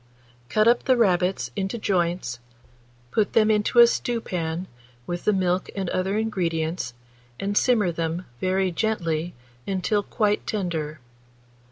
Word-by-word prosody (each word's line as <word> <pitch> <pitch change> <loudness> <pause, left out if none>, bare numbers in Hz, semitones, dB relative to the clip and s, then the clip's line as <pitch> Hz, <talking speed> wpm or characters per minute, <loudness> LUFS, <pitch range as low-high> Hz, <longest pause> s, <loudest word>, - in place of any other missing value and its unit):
Cut 215 +1 +3
up 240 +1 +4
the 255 -1 +4
rabbits 185 -4 +2
into 195 +3 -2
joints, 175 - -1 0.7
put 215 -2 +1
them 220 -1 +4
into 210 +3 +1
a 235 - +11
stewpan, 180 -8 -2 0.4
with 175 +4 -4
the - - +5
milk 185 -1 0
and 190 -3 -2
other 190 +3 0
ingredients, 165 - -1 0.4
and 200 +1 -2
simmer 215 -6 +3
them 165 +2 -3
very 185 0 +1
gently 170 -4 -1 0.3
until 195 +2 +1
quite 210 0 0
tender. 165 -7 -2
190 Hz, 130 wpm, -24 LUFS, 170-215 Hz, 0.7 s, a